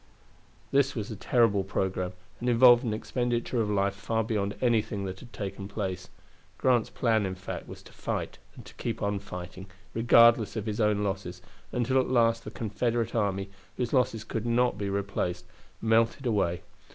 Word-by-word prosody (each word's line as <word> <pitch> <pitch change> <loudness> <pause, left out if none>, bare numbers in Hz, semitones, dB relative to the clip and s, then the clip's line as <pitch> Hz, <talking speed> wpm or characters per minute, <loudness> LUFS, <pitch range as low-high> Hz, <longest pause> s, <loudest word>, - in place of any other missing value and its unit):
This 140 0 +3
was 110 -1 -4
a - - -4
terrible 105 -1 +2
programme, 95 -1 -2 0.3
and 125 - -1
involved 120 +1 +7
an 115 - -1
expenditure 120 +2 -1
of 105 - -1
life 100 -1 +1
far 110 +3 -1
beyond 105 -2 -1
anything 110 -4 +1
that 95 0 -5
had 120 - -13
taken 100 -2 -5
place. 95 -3 -4 0.5
Grant's 125 -4 +2
plan, 115 -3 +1
in 95 -1 -2
fact, 95 0 -7
was - - -10
to - - -16
fight - - -4 0.2
and - - -12
to - - -12
keep 115 -2 -4
on 100 0 0
fighting, 90 +1 -8 0.3
regardless 115 -1 +5
of 110 -2 -3
his 110 0 -2
own 105 -1 +2
losses, 95 -3 -3 0.3
until 130 +2 +1
at 130 - +1
last 115 -2 +2
the - - -5
Confederate 115 +1 -1
army, 100 -3 -1 0.3
whose 125 -2 -2
losses 120 -4 +2
could 115 +1 -4
not 120 +1 +2
be 100 -1 -3
replaced, 100 -3 -2 0.4
melted 115 +4 +2
away. 100 -7 0
110 Hz, 175 wpm, -28 LUFS, 100-120 Hz, 0.5 s, involved